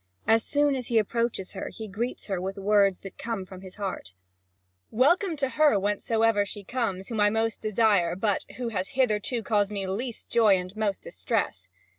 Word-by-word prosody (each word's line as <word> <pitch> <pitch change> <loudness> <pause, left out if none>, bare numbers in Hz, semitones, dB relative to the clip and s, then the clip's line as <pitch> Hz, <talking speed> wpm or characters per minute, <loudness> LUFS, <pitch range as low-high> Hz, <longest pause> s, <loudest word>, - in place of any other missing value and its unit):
As 225 0 +4
soon 290 0 +2
as 255 -3 -4
he 235 - +1
approaches 220 -2 0
her, - - -5
he 220 - -8
greets 225 +5 -4
her 190 -3 -2
with 195 +1 -4
words 200 -1 +3
that 195 - -10
come 225 -5 -3
from 185 0 -11
his 185 -1 -11
heart: 195 - -5 0.8
"Welcome 335 - +3
to 270 -2 0
her, 300 -6 +4
whence 205 +1 -1
soever 225 -2 +3
she 200 +1 -8
comes, 195 -4 -2
whom 225 -2 -3
I 205 0 +5
most 225 +1 -1
desire, 215 -5 +2
but 200 +1 0
who 245 -2 -2
has 195 +2 -3
hitherto 230 -1 +1
caused 205 -2 +1
me 200 -2 -3
least 225 +5 -4
joy 220 -5 +4
and 180 +2 -6
most 215 -2 -1
distress!" - - -2
215 Hz, 190 wpm, -27 LUFS, 195-235 Hz, 0.8 s, I